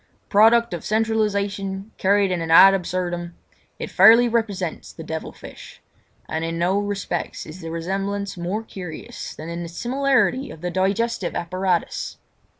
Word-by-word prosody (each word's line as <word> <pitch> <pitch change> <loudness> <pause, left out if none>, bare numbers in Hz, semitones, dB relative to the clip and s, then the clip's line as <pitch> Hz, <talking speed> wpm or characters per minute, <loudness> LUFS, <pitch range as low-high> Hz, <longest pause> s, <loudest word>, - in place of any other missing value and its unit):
Product 225 +1 +5
of 170 - -5
centralisation 205 -2 -1
carried 200 0 +3
to - - 0
an 165 -2 -3
ad 190 +4 +8
absurdum, 175 -2 -3 0.4
it - - -6
fairly 225 +6 +7
represents 205 -7 -2
the 165 - -10
devil 160 0 -5
fish; - - -12 0.5
and 160 +1 -3
in 165 0 -3
no 180 +4 +1
respects 200 -4 -3
is 165 +4 -10
the 165 - -6
resemblance 195 +4 -3
more 185 +5 -3
curious 180 -7 -8
than 155 - -8
in 170 +1 -5
the 170 - -6
similarity 265 +6 +1
of 160 - -11
the 180 0 -3
digestive 195 +2 -1
apparatus. 180 0 -2
190 Hz, 150 wpm, -22 LUFS, 175-210 Hz, 0.5 s, ad